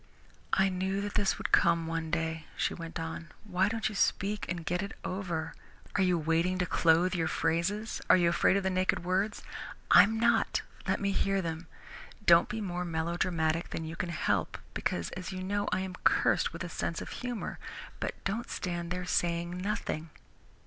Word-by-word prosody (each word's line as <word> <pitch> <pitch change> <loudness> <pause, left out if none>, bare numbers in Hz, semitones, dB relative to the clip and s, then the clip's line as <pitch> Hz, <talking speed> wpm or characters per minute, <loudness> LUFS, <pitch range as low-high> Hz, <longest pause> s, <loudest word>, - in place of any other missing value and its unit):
"I 195 0 +4
knew 190 +1 -1
that 205 0 -4
this 205 -2 +1
would - - -4
come 170 -2 +4
one 165 0 -2
day," 160 -1 -2
she - - +1
went 165 0 -6
on. 165 +1 -5 0.2
"Why 190 -1 +1
don't 225 0 -1
you 220 - -4
speak 200 +1 0
and 175 -2 -3
get 180 +2 0
it 200 - -5
over? 180 -4 -3 0.4
Are - - +3
you 180 -2 +3
waiting 165 +3 +1
to 180 - +1
clothe 170 +1 +3
your 165 -3 +1
phrases? 190 +8 0
Are - - +8
you 175 -1 +3
afraid 170 +3 +3
of 200 - -1
the 190 - +1
naked 185 -1 +1
words? 190 +4 0 0.5
I'm 220 +2 +7
not. 235 +1 +2 0.2
Let - - +1
me 200 0 0
hear 195 0 +1
them. 165 -2 -4 0.6
Don't 170 0 +6
be 220 +1 -3
more 180 -3 -2
melodramatic 165 -1 0
than 160 - -4
you 160 +1 -5
can 175 0 -3
help 160 -5 0 0.2
because, 85 -2 -2
as 185 +1 -6
you 185 0 -5
know, 205 +2 -1
I 185 - +1
am 190 -1 -4
cursed - - +3
with 170 +2 -6
a - - -3
sense 165 0 -3
of - - -9
humour, 245 -3 -4 0.4
but - - -2
don't 215 +4 -2
stand 175 -2 -3
there 180 0 -3
saying 170 0 0
nothing." 180 -4 -3
180 Hz, 190 wpm, -31 LUFS, 165-195 Hz, 0.6 s, Are